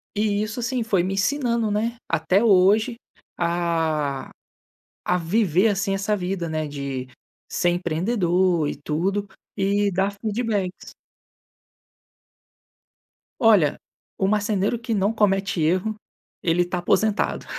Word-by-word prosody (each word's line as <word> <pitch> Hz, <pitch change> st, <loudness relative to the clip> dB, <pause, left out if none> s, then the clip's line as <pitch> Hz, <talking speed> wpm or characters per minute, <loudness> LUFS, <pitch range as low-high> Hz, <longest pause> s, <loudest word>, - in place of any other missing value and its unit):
E 210 Hz, 0 st, +1 dB
isso, 220 Hz, +3 st, -4 dB
sim, 240 Hz, 0 st, -1 dB
foi 200 Hz, -5 st, +1 dB
me 190 Hz, +2 st, -2 dB
ensinando, 235 Hz, 0 st, 0 dB
né, 230 Hz, +3 st, -1 dB
até 165 Hz, +6 st, +2 dB
hoje, 215 Hz, +3 st, +4 dB, 0.4 s
a 165 Hz, -5 st, -1 dB, 0.8 s
a 180 Hz, -, +3 dB
viver 185 Hz, +2 st, +2 dB
assim 195 Hz, 0 st, 0 dB
essa 195 Hz, +2 st, 0 dB
vida, 180 Hz, -2 st, -3 dB
né, 155 Hz, -1 st, -2 dB
de 140 Hz, -3 st, -5 dB, 0.4 s
ser 175 Hz, -, +1 dB
empreendedor 175 Hz, -1 st, +1 dB
e -, -, -3 dB
tudo, 185 Hz, +8 st, -2 dB, 0.3 s
e 200 Hz, +1 st, +2 dB
dar 195 Hz, +2 st, +1 dB
feedbacks. 215 Hz, -4 st, -2 dB, 2.5 s
Olha, 205 Hz, -11 st, +4 dB, 0.4 s
o 190 Hz, -, +1 dB
marceneiro 210 Hz, +1 st, 0 dB
que 230 Hz, -1 st, -3 dB
não 200 Hz, +2 st, +1 dB
comete 195 Hz, -4 st, +1 dB
erro, 185 Hz, +7 st, +1 dB, 0.5 s
ele 175 Hz, +1 st, +2 dB
tá 180 Hz, +1 st, -3 dB
aposentado. 215 Hz, +4 st, +1 dB
195 Hz, 115 wpm, -23 LUFS, 175-215 Hz, 2.5 s, hoje